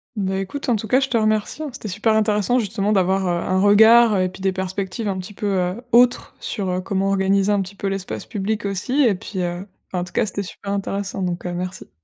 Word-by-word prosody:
Bah 190 -2 -1
écoute, 195 +10 -4
en 240 - +4
tout 220 +1 -4
cas, 255 - +4
je 270 - 0
te 250 -3 +1
remercie 215 +5 0
hein. 300 - -4
C'était 240 -4 -8
super 215 +4 +1
intéressant 215 +2 +2
justement 210 -2 -1
d'avoir, 190 -1 +2
heu, - - +1 0.2
un 185 0 +2
regard 220 +1 +6
et 185 - +2
puis 190 +1 -12
des 190 0 +1
perspectives 190 +3 -4
un 195 -2 -1
petit 185 +2 -8
peu, 210 - -5
heu, 180 +6 -2
autres 245 +1 +3
sur, 195 -3 -3
heu, 180 0 -1
comment 195 +1 -1
organiser 195 +1 +2
un 205 -1 +2
petit 190 +1 -7
peu 200 - -4
l'espace 195 -1 -4
public 210 +1 -3
aussi 225 +9 0
et 230 -5 +4
puis, 185 +1 -7
heu, 175 +2 -3 0.3
ben 180 - 0
en - - -1
tout 180 - -10
cas - - +2
c'était 200 0 -4
super 200 +1 -7
intéressant 200 0 -3
donc, 180 -1 -3
heu, 180 - -3
merci. 180 +1 -5
200 Hz, 245 wpm, -21 LUFS, 190-215 Hz, 0.3 s, regard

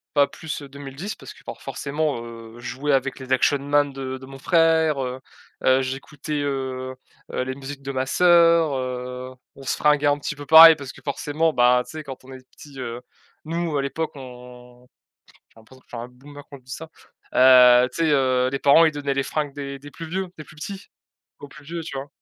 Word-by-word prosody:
Pas 145 -1 +5
plus, 155 +2 -7
heu, 140 - -10
2010 140 +8 -7
parce - - -12
que - - -19
for - - -9
forcément, 145 -3 -3
heu, 115 -1 -11
je 120 - -10
jouais 140 +3 -2
avec 135 0 0
les 130 -1 -6
Action 130 +2 +3
Man 145 0 +1
de 130 -1 -5
de 130 - -12
mon 135 0 -11
frère, 160 -2 +2
heu 130 0 -5 0.4
heu, 130 0 +4
j'écoutais, 140 +3 -4
heu 130 -2 -3 0.4
heu, - - -1
les 130 0 -4
musiques 140 +1 -9
de 135 0 -5
ma 130 -1 -1
sœur, 170 0 +4
heu. 125 0 -5 0.2
On 140 - -12
se 135 - -1
fringuait 150 -1 +3
un 145 0 +2
petit 145 - -4
peu 145 - -8
pareil 160 +2 +10
parce 140 -3 -8
que, - - -16
forcément, 150 +3 -1
ben, 125 0 +4
tu - - -13
sais, 155 -1 -7
quand 135 -2 -9
on 135 - -12
est 130 -1 -12
petits, 145 -3 -14
heu, 120 -2 -5 0.5
nous 165 0 -2
à - - +1
l'époque 155 +4 -3
on 125 -1 -13 0.6
j'ai - - -21
l'impression 130 +4 -19
que - - -31
je - - -11
suis 115 - -5
un - - -8
boomer 145 +3 -14
quand 140 - -10
je 130 - -24
dis 125 - -14
ça. 160 +3 -9 0.4
Heu, 125 -1 +7
tu - - -3
sais, 160 - +2
heu, 130 -2 +2
les 135 +1 -3
parents, 145 +4 +6
ils 160 - +4
donnaient 145 -2 -2
les 135 0 0
fringues 145 -1 -3
des 140 -1 -6
des 145 +1 -12
plus 165 +1 -9
vieux, 190 +2 -2
des 155 - -8
plus 150 +1 -17
petits 195 +5 -8 0.5
aux 145 - -10
plus 150 +1 -15
vieux, 170 +2 -5
tu 140 -4 -6
vois? 135 +1 -6
140 Hz, 230 wpm, -23 LUFS, 130-150 Hz, 0.6 s, pareil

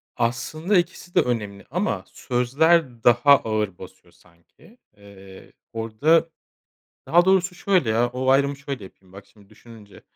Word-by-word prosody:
Aslında 155 - -1
2'si 175 0 -3
de - - +5
önemli 105 -5 -4
ama 185 +6 -2
sözler 130 +1 0
daha 125 +4 +5
ağır 105 -4 -3
basıyor - - -14
sanki. 90 - -24 0.2
Eee 100 -1 -16 0.2
orada 145 +10 +1 0.8
Daha 175 +2 +4
doğrusu 185 -1 +2
şöyle 180 - 0
ya, 115 +2 +1
o 130 +1 -2
ayrımı 140 +1 +2
şöyle 140 -5 -7
yapayım 95 0 -17
bak 100 0 -12
şimdi 100 0 -23
düşününce, 110 -1 -16
120 Hz, 135 wpm, -22 LUFS, 105-160 Hz, 0.8 s, de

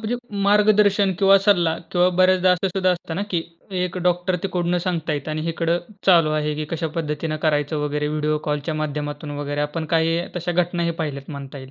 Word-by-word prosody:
म्हणजे 240 +3 -1 0.3
मार्गदर्शन 205 -1 +4
किंवा 195 0 +6
सल्ला 175 -6 +3 0.2
किंवा 180 0 +4
बऱ्याचदा 185 0 +4
असं 180 +2 0
सुद्धा 185 0 +1
असतं 170 -2 -3
ना, 200 - -1
की 170 -3 0 0.4
एक 180 0 -3
डॉक्टर 180 +1 +1
तिकडून 180 -2 0
सांगत 170 -3 -2
आहेत 145 0 -3
आणि 155 +1 -3
इकडं 165 +1 0 0.3
चालू 165 -5 +5
आहे 150 0 0
की 155 +1 -3
कशा 165 0 -2
पद्धतीने 155 0 -2
करायचं 150 0 +1
वगैरे 150 0 -1
व्हिडिओ 150 0 0
कॉलच्या 150 +2 -2
माध्यमातून 150 0 -4
वगैरे 145 0 -3
आपण 150 +2 -2
काही 165 +1 +2 0.2
तश्या 175 0 -2
घटनाही 170 -1 -2
पहिल्यात 140 -1 -5
म्हणता 140 -1 -8
येईल. 130 0 -11
165 Hz, 185 wpm, -22 LUFS, 150-180 Hz, 0.4 s, किंवा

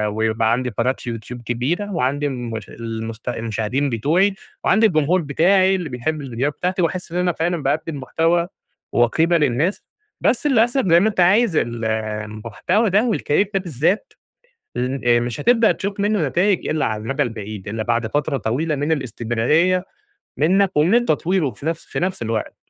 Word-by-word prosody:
ويبقى 110 0 +1
عندي 125 +2 0
قناة 120 +4 0
يوتيوب 120 +1 -6
كبيرة، 130 - -2
وعندي 145 -2 0
الم 120 -4 -5 0.2
المست 115 0 -6
المشاهدين 115 +4 -2
بتوعي، 165 - +2 0.3
وعندي 220 +3 +4
الجمهور 170 -1 +2
بتاعي 185 +6 +3
اللي 175 -5 -4
بيحب 145 +5 -3
الفيديوهات 135 +2 -2
بتاعتي، 180 0 0
وأحس 175 0 -2
إن 175 - -3
أنا 180 0 +2
فعلًا 165 -1 -2
باقدم 150 +1 -1
محتوى 165 +6 +1 0.4
وقيمة 160 +9 +3
للناس، 150 +6 0 0.4
بس 255 +4 +2
للأسف 240 -3 +2
زي 170 +1 +6
ما 215 +4 +3
أنت 205 - -5
عايز 190 +1 +4
ال 115 -3 -1
المحتوى 110 - -1
ده 215 +5 +2
والCareer 190 +5 +1
ده 195 - +2
بالذات، 170 - -1 0.6
ل 130 +2 -2
آآ 120 0 +5
مش 120 -1 -4
هتبدأ 230 -2 +4
تشوف 200 0 -4
منه 205 -7 +1
نتايج 180 +7 +1
إلا 155 0 0
على 110 -1 -2
المدى 135 +4 0
البعيد، 105 -4 -6
إلا 110 +1 -3
بعد 120 -1 0
فترة 145 +2 -1
طويلة 140 +8 -1
من 145 +3 -1
الاستمرارية 140 - +1 0.5
منك 190 +5 +3
ومن 190 +11 +4
تطويره 180 - +1
في 120 +6 -11
نفس 165 0 -2
في - - -4
نفس 185 -5 -2
الوقت، 115 -1 -3
150 Hz, 165 wpm, -21 LUFS, 120-185 Hz, 0.6 s, زي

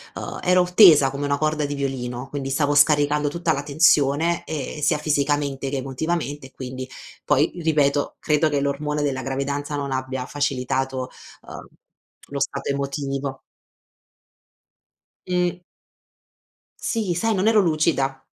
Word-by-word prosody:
uhm - - -6
ero 180 0 +4
tesa 155 -10 +8
come 140 +1 -4
una 140 0 0
corda 155 -1 0
di 145 0 -3
violino, 130 -2 -4
quindi 140 -2 -5
stavo 145 +1 +1
scaricando 145 0 +4
tutta 170 0 0
la 140 - -3
tensione, 150 +2 +3
ehm, 150 0 -5
sia 150 +1 +2
fisicamente 145 -2 0
che 140 - -2
emotivamente 145 +1 -3
e - - -23
quindi 130 0 -7 0.3
poi 150 +4 +2
ripeto 145 -3 +1
credo 155 +1 +2
che 145 -1 0
l'ormone 145 +1 -1
della 135 -2 -1
gravidanza 140 +2 -3
non 140 -1 -3
abbia 130 -1 -3
facilitato, 130 -2 -2 0.3
uhm, - - -10 0.6
lo 140 - -3
stato 140 0 -2
emotivo. 140 -1 -3 1.9
Mh. 180 -1 0 1.2
Sì, 215 -7 -1
sai, 220 +5 0
non 190 +3 +1
ero 220 -1 +5
lucida. 155 -5 0
145 Hz, 135 wpm, -23 LUFS, 135-155 Hz, 1.9 s, tesa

